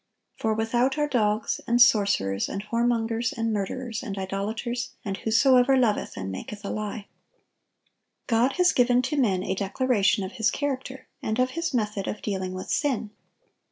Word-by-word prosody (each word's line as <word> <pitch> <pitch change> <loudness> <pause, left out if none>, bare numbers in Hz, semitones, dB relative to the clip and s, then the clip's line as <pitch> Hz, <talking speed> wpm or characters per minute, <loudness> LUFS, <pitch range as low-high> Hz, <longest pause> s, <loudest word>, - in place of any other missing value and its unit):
For 220 -1 -1
without 240 +5 +1
are 295 0 +1
dogs, 215 -5 0
and 240 +1 +2
sorcerers, 200 - +3
and 200 - -4
whoremongers, 230 0 0
and 225 -1 0
murderers, 225 +3 -3
and 200 -6 -6
idolaters, 210 +6 -3
and 195 -1 -3
whosoever 255 +4 +4
loveth 235 -5 0
and 95 0 -4
maketh 205 - -7
a - - -3
lie."(949) 215 0 -4 1.2
God 240 +2 +2
has 360 0 +4
given 245 0 +3
to 265 +4 -1
men 195 -9 +2
a 190 - -1
declaration 205 +1 +1
of 190 - -5
His 220 - +4
character, 265 -2 -4
and 220 +1 -2
of 255 0 +2
His 335 +4 -2
method 210 -5 -1
of 210 - -5
dealing 190 -3 -3
with 185 - -5
sin. 255 -7 0
225 Hz, 160 wpm, -26 LUFS, 205-255 Hz, 1.2 s, whosoever